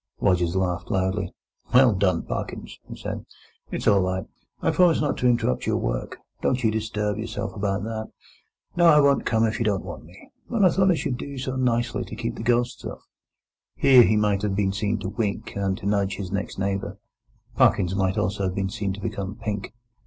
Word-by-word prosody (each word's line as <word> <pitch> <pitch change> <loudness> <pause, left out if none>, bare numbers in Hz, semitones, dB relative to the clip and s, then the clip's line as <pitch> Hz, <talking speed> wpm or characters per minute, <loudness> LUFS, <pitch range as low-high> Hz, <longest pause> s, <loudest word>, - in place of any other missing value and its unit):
Rogers 85 -1 +2
laughed 90 -2 -1
loudly. 95 0 0 0.4
"Well 125 -3 +7
done, 95 -1 +1
Parkins!" - - -5
he - - -6
said. - - -5 0.5
"It's - - -3
all 100 -1 +6
right. 95 -1 -1 0.3
I - - +1
promise 175 -3 +4
not 145 -1 0
to 125 - +2
interrupt 120 - +1
your - - +2
work; - - -3 0.2
don't 130 0 0
you 110 - +3
disturb 105 -1 -2
yourself 115 - -4
about 100 -1 -1
that. 110 0 -4 0.7
No, 175 -1 +5
I 150 -2 +7
won't 140 -1 +3
come 115 -1 +3
if 110 +2 -1
you - - +1
don't 100 -3 0
want 85 -4 -8
me; 90 +4 -16 0.2
but 225 -5 +3
I 180 - +6
thought 190 +2 +3
I 180 - +4
should 125 -5 -2
do 140 -1 -6
so 130 0 -3
nicely 120 -2 0
to - - -8
keep 115 - -3
the - - -7
ghosts 120 +1 0
off." - - -7 0.7
Here 130 -2 +7
he 110 -2 +4
might 105 -2 +2
have 105 -2 -1
been 95 -1 +1
seen 105 +2 -1
to 95 - -3
wink 105 -1 -3
and 100 -1 -1
to - - -10
nudge 100 -1 +1
his 95 -1 -6
next 100 +1 -3
neighbour. 95 0 -2 0.6
Parkins 90 0 +3
might 95 -1 0
also 100 +1 0
have 95 0 -2
been 95 -1 -1
seen 100 -4 -2
to 100 - -8
become 100 -2 -4
pink. 105 -3 -4
105 Hz, 205 wpm, -24 LUFS, 95-120 Hz, 0.7 s, Well